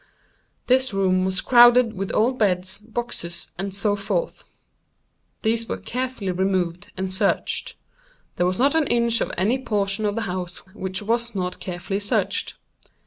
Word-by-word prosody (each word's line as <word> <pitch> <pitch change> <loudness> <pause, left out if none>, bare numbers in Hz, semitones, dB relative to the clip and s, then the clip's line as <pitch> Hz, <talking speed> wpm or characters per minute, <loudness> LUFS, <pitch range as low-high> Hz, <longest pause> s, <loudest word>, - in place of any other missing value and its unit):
This 255 -3 +2
room 185 -1 +2
was 190 0 +1
crowded 240 -1 +6
with 195 -1 -4
old 250 +4 +2
beds, 190 -2 0
boxes, 215 -6 -4
and 195 +1 -2
so 205 +2 +1
forth. 200 -3 -3 1.0
These 225 0 0
were - - -2
carefully 250 -6 -3
removed 180 -2 -1
and 190 0 -3
searched. 200 +1 0 0.6
There 175 - +2
was 185 - -1
not 275 +4 +3
an 320 -3 +2
inch 235 -1 +2
of - - -1
any 220 +8 +2
portion 205 -1 0
of 205 - -1
the 230 - -1
house 180 -3 -4 0.2
which 190 -1 -3
was 230 +1 0
not 180 -1 -3
carefully 185 +2 -4
searched. 205 - -1
200 Hz, 150 wpm, -23 LUFS, 185-235 Hz, 1.0 s, crowded